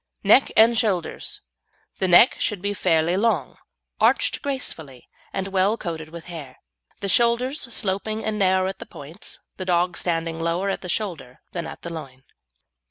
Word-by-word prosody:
NECK 215 +7 +5
AND 225 +1 +6
SHOULDERS 190 -7 -1 0.6
The 190 - +2
neck 180 +7 +7
should 210 -3 -1
be 200 +2 -2
fairly 170 -3 +2
long, 225 +4 0 0.4
arched - - +3
gracefully, 160 - -5 0.2
and 195 0 -3
well 195 +3 +2
coated 160 -5 -5
with 170 0 -9
hair; 155 -7 -8 0.4
the 200 - -1
shoulders 240 +7 +3
sloping 215 +1 -2
and 215 -1 -1
narrow 190 -1 +3
at 190 - -5
the - - -9
points, 155 +7 -9 0.2
the 185 - -5
dog 180 -1 +2
standing 165 -1 -1
lower 170 +4 0
at - - -4
the 180 - -6
shoulder 160 - -4
than 170 - -4
at - - -10
the 170 - -5
loin. 135 -5 -9
185 Hz, 165 wpm, -24 LUFS, 165-210 Hz, 0.6 s, neck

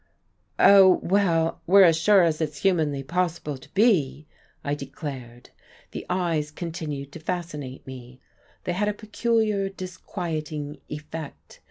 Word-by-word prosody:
"Oh, 195 -2 +7
well, 170 -4 +1
we're 195 +2 +7
as 165 -3 +6
sure 190 +4 +5
as 165 -1 +1
it's 150 -2 -2
humanly 155 -7 +1
possible 170 -1 -2
to 130 - -16
be," 170 - +2 0.4
I 145 - -1
declared. 135 -4 -8 0.4
The - - -7
eyes 170 -5 0
continued 150 -4 -6
to 165 - -9
fascinate 155 -6 -5
me, 130 -1 -10 0.4
they 175 - -2
had 205 +3 0
a 210 - +1
peculiar, 215 -2 0
disquieting 160 -5 -5
effect. 150 0 -8
165 Hz, 130 wpm, -25 LUFS, 145-185 Hz, 0.4 s, Oh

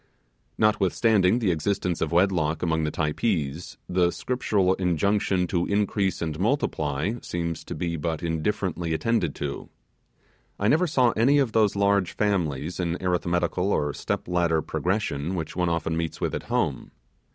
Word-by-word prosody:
Notwithstanding 105 0 +3
the 110 -7 +1
existence 90 +1 -1
of 80 - 0
wedlock 85 -3 +2
among 80 -2 +1
the - - 0
Typees, 80 -1 -2
the 90 -1 +2
Scriptural 100 -4 0
injunction 95 +1 +1
to 90 -1 -1
increase 100 -2 0
and 80 -1 -4
multiply 95 - 0
seems 85 -1 -3
to - - -6
be 85 -1 -2
but 80 +1 -3
indifferently 85 0 -1
attended 105 -6 0
to. 70 -1 -5 0.9
I 100 - +2
never 170 +6 +3
saw 130 -6 +3
any 125 +7 +3
of 135 -5 +2
those 105 -2 +3
large 100 -2 +2
families 90 -6 -1
in 85 -1 -1
arithmetical 90 +1 0
or 75 -5 0
step - - -3
ladder 85 -3 +1
progression 90 -4 -2
which 80 -3 -4
one 90 -1 +1
often 80 -1 -1
meets 80 -1 -3
with - - -1
at - - -3
home. - - -1
90 Hz, 150 wpm, -25 LUFS, 80-100 Hz, 0.9 s, Notwithstanding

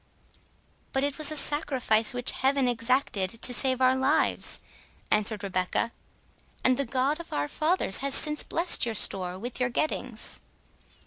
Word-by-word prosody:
"But 270 - 0
it 285 +1 -3
was 310 0 +3
a 310 - -2
sacrifice 265 -7 +1
which 245 0 +2
Heaven 270 0 +1
exacted 235 -5 0
to 245 - +2
save 260 +1 +2
our 255 0 +4
lives," 265 +1 +1 0.5
answered 210 0 +1
Rebecca, 185 +4 -1 0.7
"and 255 - +3
the 280 - -2
God 265 +5 -1
of 340 - -10
our 145 0 -2
fathers 310 - +1
has 275 0 -1
since 300 0 +3
blessed 340 +2 +3
your 230 -2 -1
store 185 -2 0
and 235 +7 -6
your 250 -1 0
gettings." 310 +6 -3
255 Hz, 150 wpm, -27 LUFS, 225-280 Hz, 0.7 s, our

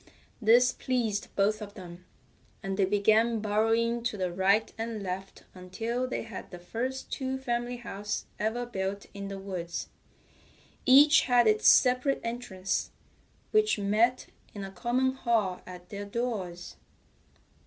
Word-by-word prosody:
This 240 +3 +5
pleased 230 -7 -1
both 210 +2 +1
of 205 0 -8
them, 180 -2 -11 0.6
and 195 0 -2
they 195 -1 +3
began 215 +4 +3
burrowing 225 +3 +1
to 225 -3 -1
the 185 -2 -2
right 195 +4 +2
and 225 -2 -4
left 190 +1 -6
until 225 +7 -3
they 255 - -3
had 225 0 -8
the 180 - -9
first 245 +9 -4
two 265 0 -2
family 245 -1 -2
house 210 -3 -5
ever 220 +3 -1
built 200 -3 -4
in 200 0 -6
the 195 0 -6
woods. 180 -3 -5 1.0
Each 290 +4 +8
had 245 -2 +4
its 215 -1 +3
separate 255 +2 +5
entrance, 230 -6 -3 0.6
which 430 - +3
met 215 +5 +2 0.3
in 200 - -5
a 195 - -7
common 250 +5 0
hall 230 -8 0
at 180 -1 -11
their 205 0 -6
doors. 200 -6 -4
215 Hz, 140 wpm, -29 LUFS, 195-240 Hz, 1.0 s, Each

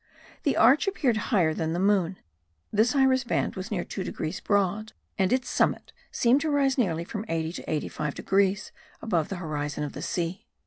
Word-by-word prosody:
The - - +1
arch 285 +8 +5
appeared 275 - +1
higher 175 -9 +3
than 160 0 -2
the 175 - -1
moon; 190 -2 +2 0.6
this 225 +5 +3
iris 265 -2 +4
band 240 - -1
was 190 +1 -5
near 185 -5 -1
2 190 - -5
degrees 160 0 -4
broad, 205 +1 0 0.3
and 190 0 +2
its 255 0 +1
summit - - 0 0.2
seemed 250 +4 +3
to 315 - -1
rise 275 -2 +2
nearly 170 - 0
from 210 +4 -5
80 165 0 -2
to - - -7
85 150 -1 -2
degrees 195 +1 +1 0.3
above 170 -8 0
the 195 - -3
horizon 150 -4 -3
of 145 - -4
the - - -7
sea. 175 +1 -3
195 Hz, 185 wpm, -27 LUFS, 165-235 Hz, 0.6 s, arch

